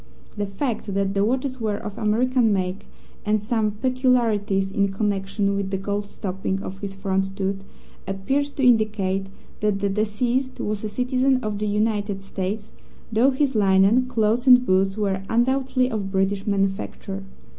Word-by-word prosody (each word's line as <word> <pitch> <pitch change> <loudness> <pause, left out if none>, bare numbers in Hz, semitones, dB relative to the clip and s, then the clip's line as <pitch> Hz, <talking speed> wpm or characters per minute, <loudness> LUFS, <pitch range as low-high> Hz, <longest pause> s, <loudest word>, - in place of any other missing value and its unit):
The 205 -1 -2
fact 215 0 -3
that 195 0 0
the 200 0 +2
watches 255 +3 -1
were 210 -2 0
of 210 -1 -7
American 235 +2 +2
make, 185 -1 -2 0.4
and 215 0 +2
some 215 0 0
peculiarities 220 -4 +1
in 200 0 +1
connection 200 0 -1
with 200 -1 -2
the 195 - -1
gold 200 +1 -2
stopping 190 -1 -3
of 190 +1 -7
his 195 -1 -5
front 195 0 -1
tooth, 195 0 -2 0.4
appeared 195 +10 0
to 270 - +2
indicate 210 -5 +2 0.3
that 210 -2 +1
the 200 0 0
deceased 235 +6 -1
was 210 0 -2
a 215 - -2
citizen 255 +3 +1
of 210 -1 -3
the 210 - -1
United 205 -1 0
States, 195 +2 -4 0.4
though 235 +5 +5
his 275 0 +1
linen, 200 +4 +4
clothes 235 +1 +1
and 250 -1 +8
boots 195 0 +2
were 195 -2 0
undoubtedly 255 +2 +1
of 200 -3 -3
British 195 +1 0
manufacture. 195 0 -2
210 Hz, 155 wpm, -23 LUFS, 195-240 Hz, 0.4 s, and